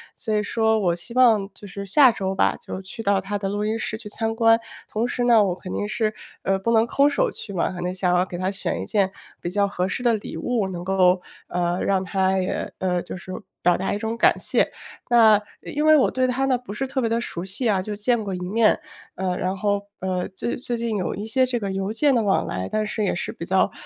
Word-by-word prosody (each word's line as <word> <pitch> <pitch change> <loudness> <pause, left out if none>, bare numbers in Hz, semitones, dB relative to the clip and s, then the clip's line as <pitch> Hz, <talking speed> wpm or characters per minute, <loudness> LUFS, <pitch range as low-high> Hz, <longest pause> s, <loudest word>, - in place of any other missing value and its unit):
所 220 - -3
以 210 - +2
说 220 +1 +1
我 175 -4 +1
希 205 +7 -9
望 220 -6 +5
就 205 - -12
是 200 +1 -6
下 260 +6 +6
周 195 -4 -2
吧， 190 - +2
就 190 - -5
去 195 +4 -8
到 200 -1 +3
他 195 +2 -3
的 195 -1 -3
录 205 +1 -2
音 220 +1 0
室 220 - -3
去 220 - -10
参 225 +2 -2
观。 225 0 +5 0.3
同 220 +2 -1
时 245 0 -1
呢， 230 -3 +6
我 185 -3 +1
肯 185 0 -8
定 205 - -1
是， 215 0 0 0.3
呃， 195 0 +2
不 210 +5 -1
能 225 0 +4
空 280 +4 +4
手 - - +1
去 225 - -7
嘛， 185 - 0
可 175 - -6
能 180 +1 -2
想 180 -1 +1
要 180 +1 +3
给 180 - -7
他 185 +1 -1
选 195 0 -2
一 - - -4
件 200 -3 +1 0.3
比 175 - -3
较 200 +2 +1
合 180 -2 -1
适 220 - -3
的 240 -2 +3
礼 210 - -4
物， 225 -6 -1
能 175 -1 -6
够， 185 -1 +3 0.3
呃， 175 0 0
让 195 -1 +1
他 190 +1 +1
也 185 -1 -2
呃， 180 -1 0
就 180 - -7
是 185 +1 -8 0.3
表 175 0 +4
达 190 - -2
一 - - -1
种 220 +2 -3
感 - - +4
谢。 - - +1 0.4
那， 230 -2 +7
呃， 210 - -1 0.3
因 300 - +1
为 310 0 +7
我 270 - +4
对 255 0 +1
他 255 +2 0
呢， 260 -2 +2
不 240 -4 -9
是 270 +5 -2
特 265 0 -1
别 230 - 0
地 230 - +1
熟 175 -7 -5
悉 200 +6 -1
啊， 195 -3 +2
就 210 +2 -5
见 225 +1 +1
过 195 - -4
一 180 - -4
面。 210 +5 +2 0.4
呃， 185 -1 -1
然 185 +1 -1
后， 200 +1 0 0.2
呃， 185 -1 -1
最 235 - -3
最 245 -1 -3
近 230 -2 -1
有 185 - -2
一 205 - -5
些 255 +4 +2
这 250 -1 -1
个 200 -4 -3
邮 195 +2 -2
件 280 +4 +3
的 235 - +3
往 200 -3 +2
来， 95 0 -3
但 215 0 0
是 215 0 -2
也 - - 0
是 - - -3
比 170 - -7
较 190 +2 +2
205 Hz, 280 characters per minute, -23 LUFS, 190-230 Hz, 0.4 s, 那